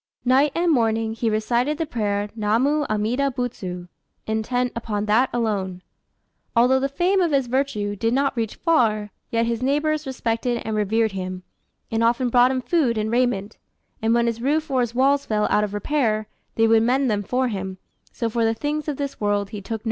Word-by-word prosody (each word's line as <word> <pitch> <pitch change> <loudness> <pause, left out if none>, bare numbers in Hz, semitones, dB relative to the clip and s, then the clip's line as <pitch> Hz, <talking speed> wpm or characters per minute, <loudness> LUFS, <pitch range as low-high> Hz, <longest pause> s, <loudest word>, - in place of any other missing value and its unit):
Night 270 +4 +4
and 340 0 +2
morning 225 -4 +1
he 230 0 -1
recited 235 +7 0
the 325 - -1
prayer 205 -6 -1
"Namu 245 +8 +1
Amida 225 +6 0
Butsu," 190 -9 -5 0.4
intent 245 +3 -1
upon 215 -3 -2
that 225 +5 +3
alone. 195 -6 -2 0.7
Although 250 +3 +4
the 275 +1 -1
fame 365 +7 +1
of 345 - +2
his 275 -2 +2
virtue 240 -5 -1
did 225 +3 0
not 275 +2 +1
reach 225 -3 -2
far, 220 - +1 0.2
yet 230 0 +1
his 230 0 -2
neighbours 295 +3 0
respected 240 -2 -2
and 220 - -2
revered 215 +1 +1
him, 185 -1 -5 0.5
and 225 0 +1
often 240 +2 +2
brought 245 +1 +5
him 260 -1 -1
food 270 -9 +1
and 215 +1 -1
raiment; 235 -4 0 0.4
and 225 +1 +2
when 235 0 +3
his 230 -1 -2
roof 305 +3 0
or 260 -1 +2
his 240 -1 -2
walls 275 +2 +2
fell 210 -1 +1
out 210 - +3
of 210 - -2
repair, 215 -1 0 0.3
they 225 - +3
would 225 0 +5
mend 260 +4 +2
them 205 -1 0
for 250 +5 0
him; 190 -3 -4 0.3
so 230 - -2
for 230 +1 0
the 225 0 +2
things 300 +5 -3
of 295 -3 -2
this 280 -4 -5
world 205 -1 0
he 210 -3 -6
took 195 - -12
no - - -1
thought. - - -19
230 Hz, 200 wpm, -23 LUFS, 215-265 Hz, 0.7 s, brought